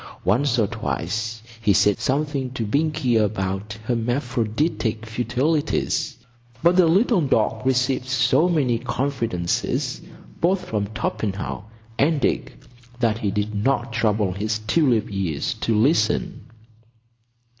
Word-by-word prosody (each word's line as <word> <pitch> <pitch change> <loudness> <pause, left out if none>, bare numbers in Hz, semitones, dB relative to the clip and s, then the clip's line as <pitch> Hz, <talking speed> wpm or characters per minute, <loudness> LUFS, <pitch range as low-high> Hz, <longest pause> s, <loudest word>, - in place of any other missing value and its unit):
Once 125 +7 +2
or 110 - +3
twice 110 +4 -3 0.2
he 105 -3 +3
said 100 +1 +3
something 140 -1 -1
to 120 -3 -4
Binkie 145 0 +1
about 100 +1 -3
"hermaphroditic 120 0 -1
futilities," 125 +5 -1 0.5
but 170 +1 +5
the 180 -2 +5
little 195 +4 +3
dog 110 -5 +1
received 130 0 +1
so 135 +5 +3
many 130 -9 +1
confidences 120 -8 -1 0.4
both 185 +2 +1
from 105 -2 -2
Torpenhow 105 -3 -3 0.3
and 150 +2 +3
Dick 135 -2 -1 0.4
that 115 -2 +1
he 105 - -1
did 105 +2 -2
not 120 +2 0
trouble 105 -4 +1
his 105 +4 -2
tulip 115 +1 +2
ears 90 -7 -2
to 115 - +1
listen. 110 -1 +1
115 Hz, 115 wpm, -23 LUFS, 105-135 Hz, 0.5 s, but